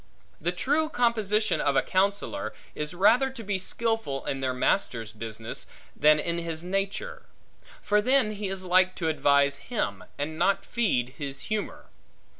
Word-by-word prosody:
The 175 - +1
true 290 - +1
composition 220 -5 +1
of 140 -1 +1
a 135 - +4
counsellor, 200 +2 0 0.2
is 150 +3 -4
rather 230 +9 +4
to 260 -3 -9
be 200 -2 -1
skilful 225 -8 -1
in 135 - -2
their 130 -1 0
master's 120 - 0
business, 110 +1 -5 0.3
than 150 0 +5
in 170 +2 -1
his 165 -1 -4
nature; 195 +2 -3 0.6
for 210 0 +3
then 255 -1 +3
he 210 -1 -4
is 190 -1 -4
like 185 +1 +4
to 165 -3 -1
advise 140 -2 +3
him, 100 - -2
and 155 +2 -4
not 195 +2 +2
feed 150 - 0
his 140 -2 -5
humor. 215 -1 -4
185 Hz, 155 wpm, -27 LUFS, 140-215 Hz, 0.6 s, than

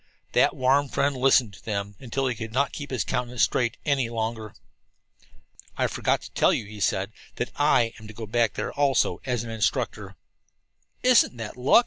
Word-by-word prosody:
That - - +3
warm 135 +2 +2
friend 140 +2 +1
listened 130 -4 +3
to 90 - -15
them 100 -2 -3
until 135 +2 -2
he 130 - +1
could 110 0 -7
not 140 +3 +1
keep 145 -1 -7
his 130 -5 -1
countenance 125 -1 -1
straight 120 -2 +1
any 135 -5 +1
longer. 110 -1 -4 1.2
"I - - +2
forgot - - 0
to - - -10
tell - - +3
you," 110 - -1
he 105 0 -10
said, 95 +1 0 0.2
"that 120 - -3
I 120 -6 +3
am 110 - -11
to 110 - -10
go 115 - -6
back 115 +1 +1
there, - - -3
also, 140 -3 +1
as 125 -3 0
an 115 - -7
instructor." 110 -3 -2 0.9
"Isn't 250 - +5
that 115 -2 -6
luck!" 125 - +5
120 Hz, 185 wpm, -25 LUFS, 110-135 Hz, 1.2 s, Isn't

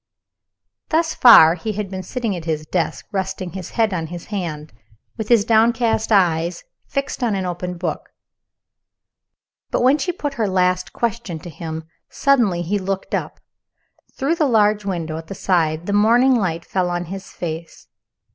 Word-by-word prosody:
Thus 320 0 +1
far, 165 -10 +8
he 210 +5 -4
had 205 -1 -4
been 190 -1 -4
sitting 225 +2 -3
at 170 -2 -7
his 155 -2 -2
desk, 170 +2 -2
resting 190 -2 -3
his 185 0 -7
head 220 -3 +2
on 165 -3 -2
his 175 +1 -8
hand, 155 -6 -4 0.4
with 220 -3 -5
his 230 -4 +4
downcast 225 0 +2
eyes 175 -4 +2 0.2
fixed 275 -1 -3
on 225 -4 +1
an 190 -1 -2
open 180 0 -4
book. 170 -2 -4 1.6
When 265 +4 +3
she 355 - -1
put 295 -5 -4
her 215 - +2
last 185 -1 +1
question 230 -7 -3
to 175 - -9
him 160 +1 -6
he - - -30 0.2
suddenly 230 -11 +2 0.2
looked 195 0 -4
up. - - -3 0.8
Through 295 +6 0
the 310 -4 +2
large 210 -3 +3
window 165 -5 -3
at 160 - -12
his 195 - -6
side 165 -3 +1
the 200 - -2
morning 235 +6 +4
light 175 -8 -1
fell 185 -2 -1
on 175 0 -2
his 190 +2 -8
face. 165 -1 -7
190 Hz, 165 wpm, -20 LUFS, 175-225 Hz, 1.6 s, far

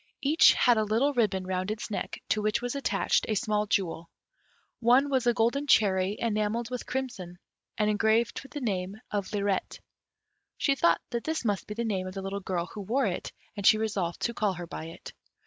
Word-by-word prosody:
Each 300 +4 +6
had 240 -3 +4
a - - +2
little 230 +7 +1
ribbon 205 -7 +1
round 185 +1 -2
its 215 +1 -4
neck, 200 - -4
to 215 - +1
which 210 0 +1
was 245 0 -3
attached 280 -1 0
a 215 - +1
small 210 +1 0
jewel. 170 -4 -1 0.7
One 255 +4 +4
was 260 -3 +1
a 240 - +5
golden 260 +6 +1
cherry 195 -5 +3
enamelled 225 +1 -1
with 250 - -5
crimson, 240 -10 -4 0.4
and 210 - +2
engraved 220 +2 +2
with 270 -1 -14
the 290 - -5
name 195 -4 -2 0.2
of 200 -2 -2
"Lirette." 200 -2 -1 0.8
She 280 - +2
thought 170 -11 +3
that 235 -1 -2
this 315 -5 -2
must 205 -3 -1
be 210 - -6
the 235 +1 -2
name 190 -4 -1
of 185 - -8
the 195 - -4
little 195 +1 -3
girl 180 -3 -2
who 210 - -6
wore 235 +8 0
it, - - -3 0.2
and 200 - -5
she 215 - +7
resolved 200 -6 -2
to 235 - 0
call 210 -4 0
her 175 -1 -6
by 160 - -7
it. 165 - -10
215 Hz, 205 wpm, -28 LUFS, 190-240 Hz, 0.8 s, she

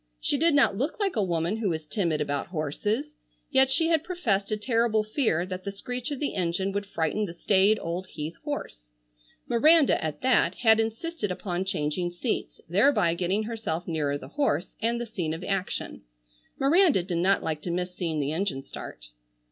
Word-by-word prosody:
She - - 0
did 320 +2 +3
not 275 -8 +4
look 275 - -2
like 395 -6 0
a 215 - +2
woman 170 +2 0
who 220 -3 0
was 160 -2 -3
timid 155 -1 -1
about 145 -1 -2
horses, 210 - -2 0.3
yet 265 -1 +5
she 325 +4 +2
had 320 -2 +2
professed 250 - -1
a 215 - 0
terrible 225 -1 +1
fear 215 - +1
that 185 0 -6
the 200 - -3
screech 245 +6 -5
of 285 -3 -4
the 290 - -1
engine 185 +1 -1
would 200 0 -3
frighten 195 +3 -1
the 170 -3 -8
staid 200 +4 +3
old 175 +3 -4
Heath 155 -1 -6
horse. - - -5 0.6
Miranda, 300 - +4
at 155 -2 -3
that, 255 -2 +3
had 220 -2 +4
insisted 225 - -2
upon 180 0 -3
changing 175 0 -1
seats, 175 +7 -3
thereby 180 - +3
getting 185 +5 0
herself 215 -7 -4
nearer 150 -4 0
the - - -11
horse, 190 - -1
and 235 +1 +1
the 240 - -3
scene 175 -8 -3
of 165 - -8
action. 195 -1 -3 0.6
Miranda 295 - +4
did 175 -2 -2
not 190 +2 +3
like 155 -2 -2
to 175 - -5
miss 180 +1 -2
seeing 165 -4 -2
the 145 0 -1
engine 160 -5 -2
start. - - -9
195 Hz, 190 wpm, -27 LUFS, 170-240 Hz, 0.6 s, yet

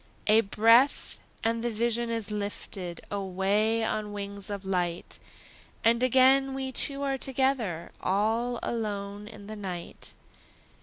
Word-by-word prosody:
A 215 +1 +6
breath, 230 +6 +3 0.2
and 230 0 0
the 240 - +1
vision 235 +1 0
is 225 -2 -2
lifted 200 -4 -4
Away 200 +3 +1
on 215 -1 -2
wings 200 -1 -5
of 200 -1 -5
light, 175 -3 -2 0.6
And 230 +1 +4
again 265 +2 +4
we 265 -1 -3
two 280 +2 +1
are 270 -1 -1
together, 255 -11 -1
All 225 +5 +1
alone 205 -2 -3
in 210 -2 -11
the 215 +1 -7
night. 185 -4 -7
215 Hz, 130 wpm, -28 LUFS, 200-240 Hz, 0.6 s, A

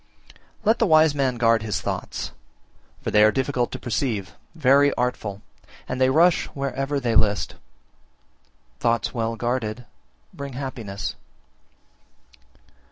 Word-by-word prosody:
36. - - -24
Let 220 +3 +3
the 225 - +3
wise 155 -2 +5
man 135 -3 0
guard 115 -2 +3
his 105 -4 -2
thoughts, - - -4 0.7
for - - -2
they 105 0 +6
are 110 - +6
difficult 130 0 -1
to - - -4
perceive, 115 -5 -2 0.2
very 140 -1 +5
artful, 110 -5 -2 0.4
and 125 +1 -3
they 130 - +5
rush 165 +5 +4
wherever 140 +1 -2
they 120 -3 -1
list: 105 -2 +2 1.3
thoughts 115 0 +1
well 115 -2 -1
guarded 120 -1 -2 0.5
bring 140 -1 -7
happiness. 120 -7 -5
125 Hz, 125 wpm, -24 LUFS, 115-140 Hz, 1.3 s, they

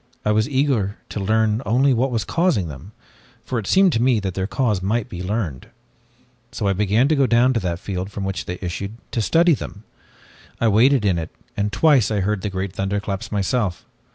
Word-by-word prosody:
I 105 - +3
was 110 +3 +1
eager 130 -8 0
to - - -4
learn 110 +2 +1
only 130 +4 +3
what 125 +3 +1
was 115 -3 -1
causing 165 - +1
them, 75 +8 -10 0.5
for 125 - -2
it 105 - -7
seemed 190 -3 +4
to 115 - +1
me 125 -2 +3
that 95 -2 -3
their 95 +1 -2
cause 105 -5 0
might 105 +4 -1
be 90 - -6
learned. 95 - -3 0.8
"So 105 - -2
I 100 - +2
began 105 +6 +2
to 155 - +3
go 135 -2 +3
to 120 +1 +3
that 85 -4 -2
field 95 0 -4
from 100 - -5
which 95 0 -3
they 90 - -5
issued, 100 +5 -5
to 115 - -1
study 170 - +4
them. 105 -6 -6 0.8
I 115 - +3
waited 120 +3 +4
in 90 -4 +2
it 80 - -5 0.3
and 105 0 -1
twice 140 -4 +4
I 105 -2 0
heard 105 +1 -1
the 105 - -2
great 95 -1 -4
thunderclaps 100 +2 -3
myself. 105 -2 -1
105 Hz, 205 wpm, -21 LUFS, 95-125 Hz, 0.8 s, seemed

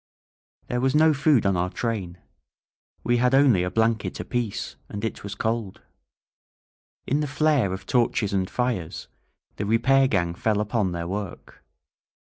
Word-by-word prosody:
There 125 0 -2
was 135 +2 +1
no 155 +1 +5
food 140 -4 +3
on 100 -1 +2
our 90 +1 0
train. 95 -3 -3 0.9
We 120 +1 +2
had 125 +2 +3
only 135 -9 +5
a 90 - -1
blanket 110 +2 0
apiece; 120 -5 -3
and 105 +2 -4
it 110 - -4
was 100 0 -6
cold. 110 -2 -3 1.2
In 140 - 0
the 150 - -1
flare 145 -7 +2
of 95 - -6
torches 115 -4 +1
and 95 -1 0
fires, 120 -10 -2 0.5
the 105 - -2
repair 135 +5 +4
gang 85 -7 0
fell 105 +4 0
upon 105 -2 0
their 85 -1 -4
work. 100 0 -6
110 Hz, 150 wpm, -25 LUFS, 95-125 Hz, 1.2 s, no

